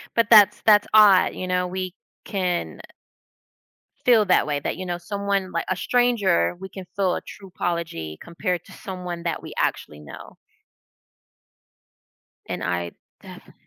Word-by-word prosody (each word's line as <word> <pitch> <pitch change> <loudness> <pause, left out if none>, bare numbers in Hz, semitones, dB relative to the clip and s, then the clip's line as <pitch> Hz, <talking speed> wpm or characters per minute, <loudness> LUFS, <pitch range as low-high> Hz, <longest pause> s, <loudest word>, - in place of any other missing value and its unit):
But 230 -2 +2
that's 210 -3 +7
that's 210 -2 +5
odd, 210 -4 +6
you 185 - -5
know, 180 0 0
we 185 0 -4 0.3
can 180 -4 -3 1.2
feel 235 -3 +5
that 185 - +3
way 145 -1 -1
that, - - -4
you 185 - -6
know, 175 -1 -4
someone 200 0 -2
li 170 - -2
a 185 - 0
stranger, 215 - +1
we 190 0 -8
can 190 0 -9
feel 190 -3 +1
a - - -4
true 195 - -12
apology 165 - -4
compared 175 0 -3
to - - -17
someone 180 -3 -7
that 170 -1 -3
we - - -9
actually 75 - -2
know. 75 - -12 2.1
and - - -4
I 85 -1 -2 0.3
defi - - -13
185 Hz, 150 wpm, -23 LUFS, 170-200 Hz, 2.1 s, that's